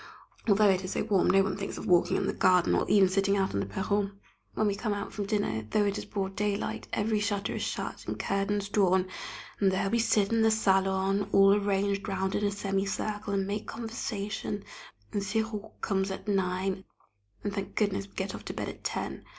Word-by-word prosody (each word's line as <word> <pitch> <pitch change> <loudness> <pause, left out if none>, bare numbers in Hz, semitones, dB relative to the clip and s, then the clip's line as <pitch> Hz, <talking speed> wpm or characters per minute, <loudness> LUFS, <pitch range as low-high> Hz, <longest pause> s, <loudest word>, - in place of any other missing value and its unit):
Although 205 -1 +5
it 190 0 0
is 185 - -3
so - - 0
warm 205 -4 +2
no 195 0 +5
one 195 - -1
thinks 195 -1 -5
of - - -6
walking 175 -1 +4
in - - 0
the - - 0
garden, 180 -2 +4
or - - +1
even 200 -2 +6
sitting 195 +1 +2
out 190 -1 0
on 100 - 0
the 100 - -2
perron. 200 - -1 0.4
When 215 - +1
we 205 - +2
come 205 +1 -2
out 200 -1 -5
from 205 -2 -3
dinner, 200 - -1
though 210 -1 +2
it 200 -1 0
is - - -6
broad 195 -1 -3
daylight, 205 0 -2
every 215 0 +1
shutter 205 -1 -1
is - - -3
shut - - -4
and - - -3
curtains 200 +1 -1
drawn, 190 -3 +3 0.5
and 195 -2 +4
there 190 +1 0
we 235 - +2
sit 210 -2 +2
in 225 - +3
the 220 - +5
salon, 195 -1 +2
all 195 0 +7
arranged 200 0 0
round 190 -1 -1
in 210 - 0
a 205 - +3
semi 195 -1 -1
circle, 205 +1 -3
and 195 -1 +1
make 205 +2 -3
conversation, 210 -3 -4 0.5
and 205 - 0
sirop 220 +1 -3
comes 195 -2 0
at 190 - -6
nine, 190 -1 0 0.6
and, 205 - -2
thank 200 -1 -4
goodness, 200 -2 0
we 195 - -25
get 190 0 -3
off - - -8
to - - -4
bed - - -3
at - - -10
ten! - - -3
200 Hz, 215 wpm, -29 LUFS, 195-205 Hz, 0.6 s, all